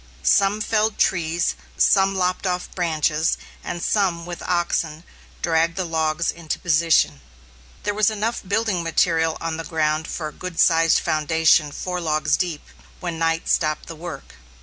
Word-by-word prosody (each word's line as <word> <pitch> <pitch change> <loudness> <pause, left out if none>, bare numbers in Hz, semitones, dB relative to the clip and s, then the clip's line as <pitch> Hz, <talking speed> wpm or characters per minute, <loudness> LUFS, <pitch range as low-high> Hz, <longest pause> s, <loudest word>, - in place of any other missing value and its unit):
Some 195 - +3
felled 215 0 +1
trees, 170 -1 +1 0.2
some 195 -1 +4
lopped 185 +1 0
off 180 0 -2
the - - -18
branches, 160 -2 0 0.3
and 175 - -5
some, 180 -5 +1
with 175 -1 -7
oxen, 170 -2 -1 0.4
dragged 165 0 +2
the 185 -1 -2
logs 160 0 0
into 170 -2 -4
position. 160 - +2 0.6
There 205 - -1
was 210 0 +3
enough 220 +2 -2
building 200 -2 0
material 165 -1 +1
on 165 -1 -3
the 165 - -4
ground 155 -1 -1
for 155 -3 -4
a - - -16
good 180 -2 -7
sized 165 0 +5
foundation 155 -1 +2
four 180 +3 -4
logs 155 -2 +1
deep, 170 -5 -3 0.4
when 170 -3 -4
night 165 0 0
stopped 155 -2 +1
the 165 - -8
work. 160 -3 -8
165 Hz, 155 wpm, -22 LUFS, 160-180 Hz, 0.6 s, sized